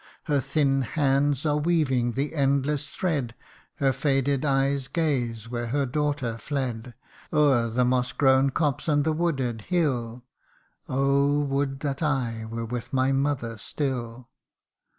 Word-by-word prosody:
Her 145 -2 +1
thin 140 0 +1
hands 140 +1 +1
are 150 -1 +2
weaving 140 -7 +1
the 140 +5 -2
endless 140 0 +1
thread, 140 -10 -2 0.4
Her 135 -1 +1
faded 135 0 +1
eyes 135 -1 +1
gaze 125 -9 -1
where 120 0 -3
her 140 +4 0
daughter 135 -4 -1
fled, 125 -2 -4 0.4
O'er 140 -6 +3
the 125 +2 +1
moss 125 0 +1
grown 135 0 +4
copse 145 0 -1
and 145 -2 +3
the 160 +1 +1
wooded 135 -9 -1
hill: 125 -8 -1 0.3
' - - -35
Oh! 140 +2 +2
would 135 -1 -1
that 140 -2 -3
I 125 -7 -1
were 115 0 -4
with 120 0 -5
my 130 0 +2
mother 135 -5 -1
still 125 -1 -4
135 Hz, 140 wpm, -26 LUFS, 125-145 Hz, 0.4 s, grown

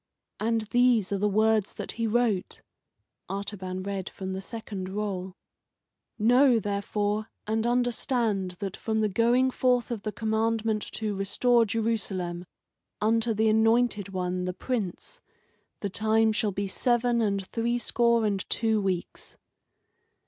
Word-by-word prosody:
And 225 +1 +1
these 245 -5 +3
are 200 - 0
the 210 +1 +2
words 215 0 +2
that - - -5
he 230 -1 -2
wrote." 220 -4 0 0.7
(Artaban 190 -2 -4
read 195 -1 -4
from 190 -1 -6
the 190 - -4
second 200 -3 -6
roll:) 190 -2 -4 0.8
"'Know, 245 +3 +5
therefore, 205 +1 -1 0.2
and 220 +2 0
understand 240 -5 0
that 195 -1 -4
from 220 -1 -1
the 215 - +2
going 240 +5 +3
forth 250 -1 +1
of 225 -4 -3
the 215 - -3
commandment 220 0 0
to 215 -2 -2
restore 230 +5 +2
Jerusalem, 195 -6 -2 0.5
unto 225 +2 +2
the 220 +1 +2
Anointed 220 -1 +3
One, 180 -1 -2
the 180 - -2
Prince, 245 - -4 0.6
the 200 - -2
time 220 +2 +3
shall 215 -1 0
be 200 +1 -2
seven 240 +3 +1
and 200 -3 0
threescore 235 +1 +1
and 200 -2 0
two 220 -2 +1
weeks." 185 -3 -4
215 Hz, 135 wpm, -27 LUFS, 195-230 Hz, 0.8 s, Know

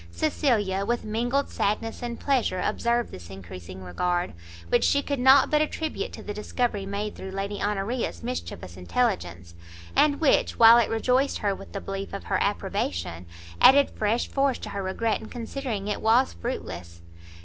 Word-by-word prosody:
Cecilia 195 - 0
with 240 +3 -1
mingled 240 +6 0
sadness 215 +2 -1
and 240 -1 -5
pleasure 255 -9 +1
observed 235 +5 0
this 85 -2 -10
encreasing 95 -1 -9
regard, 175 - -1 0.4
which - - +3
she 285 0 +3
could 280 -1 -2
not 265 +2 +6
but 300 0 +4
attribute 320 +8 -2
to - - -9
the 205 - -5
discovery 210 -1 -2
made 205 +1 -3
through 190 - -7
Lady 195 +1 -4
Honoria's 205 - -2
mischievous 85 +1 -5
intelligence, 90 - -1 0.4
and 290 -1 +4
which, 310 -4 +2
while 230 +1 +9
it 235 - +1
rejoiced 250 +5 +1
her 205 -2 0
with - - -11
the 200 - -4
belief 195 0 -5
of 200 - -5
her - - -1
approbation, 90 - -2 0.3
added 280 +1 +7
fresh 220 +3 0
force 275 -2 +1
to - - -7
her 200 - -4
regret 215 +4 -1
in 220 - -9
considering 235 -3 -4
it 210 - -2
was 235 +4 +3
fruitless. 85 - -6
210 Hz, 165 wpm, -26 LUFS, 180-245 Hz, 0.4 s, while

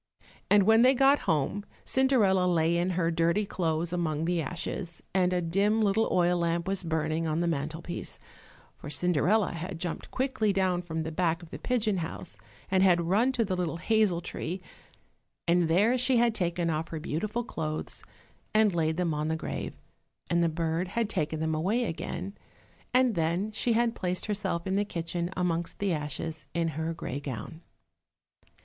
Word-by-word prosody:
And 205 -1 +6
when 220 +3 +6
they 260 +2 +6
got 275 +2 +5
home 160 +6 +1 0.2
Cinderella 215 -9 +3
lay 170 -1 +2
in 175 +2 +1
her 170 -2 +2
dirty 170 +5 +2
clothes 165 -2 -1
among 160 -3 -1
the 175 -1 +1
ashes, 170 +2 -5
and 180 -1 +3
a 180 -1 0
dim 200 +6 +2
little 215 +1 +2
oil 175 0 +3
lamp 170 +1 0
was 195 -1 -1
burning 160 0 -1
on 155 +1 0
the 175 - +1
mantle 160 +1 -2
piece, 175 0 -4 0.6
for - - -9
Cinderella 180 +6 +2
had 170 +2 -5
jumped 175 -1 -4
quickly 255 -5 0
down 185 -2 +1
from 160 -2 -3
the 160 - -4
back 170 0 0
of 165 - -13
the - - -7
pigeon 220 -5 0
house 170 +1 -6 0.3
and 190 -1 +4
had 180 -2 +5
run 225 +8 +3
to 235 -3 +1
the 190 -2 -1
little 175 -2 -2
hazel 205 -2 +2
tree, 175 +1 -4 0.9
and 170 0 +3
there 200 +9 +4
she 255 0 +3
had 235 -1 +3
taken 175 -4 0
off 160 +1 -2
her 160 - -5
beautiful 210 +10 -2
clothes 155 -8 -4 0.5
and 215 -2 +5
laid 160 -1 0
them 175 -3 0
on 150 +1 -1
the 160 - 0
grave, 160 - -5 0.5
and 170 0 +3
the 170 - +3
bird 165 +2 -1
had 225 +2 -1
taken 160 -4 -1
them 160 0 0
away 195 +10 +1
again, 185 +2 -4 0.6
and 255 -2 +4
then 170 +4 0
she 230 +2 0
had 230 0 +2
placed 180 -3 -2
herself 195 -5 -2
in 190 0 0
the 205 - +3
kitchen 170 -2 -3
amongst 170 -2 -1
the 200 -3 0
ashes 155 +1 -4
in 165 -1 +1
her 160 +2 -3
grey 145 -4 -4
gown. 145 +4 -6
175 Hz, 180 wpm, -29 LUFS, 165-205 Hz, 0.9 s, And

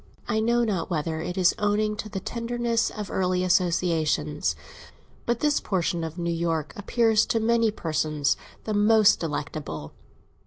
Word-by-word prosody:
I 220 -2 +1
know 235 +2 +2
not 200 -7 -1
whether 160 -1 -2
it 180 +3 -4
is 180 -2 +4
owing 210 +1 +1
to 215 - -5
the 195 - -4
tenderness 235 +1 -1
of 210 -2 -6
early 185 -1 0
associations, 165 - +1 0.7
but 235 -1 0
this 295 -1 +2
portion 175 -3 -1
of 160 +1 -5
New 170 -1 -1
York 165 -2 -1
appears 220 +1 +2
to 225 - +1
many 230 0 +3
persons 155 -6 0 0.3
the 215 - -3
most 210 0 +5
delectable. 145 - -5
185 Hz, 150 wpm, -26 LUFS, 160-220 Hz, 0.7 s, most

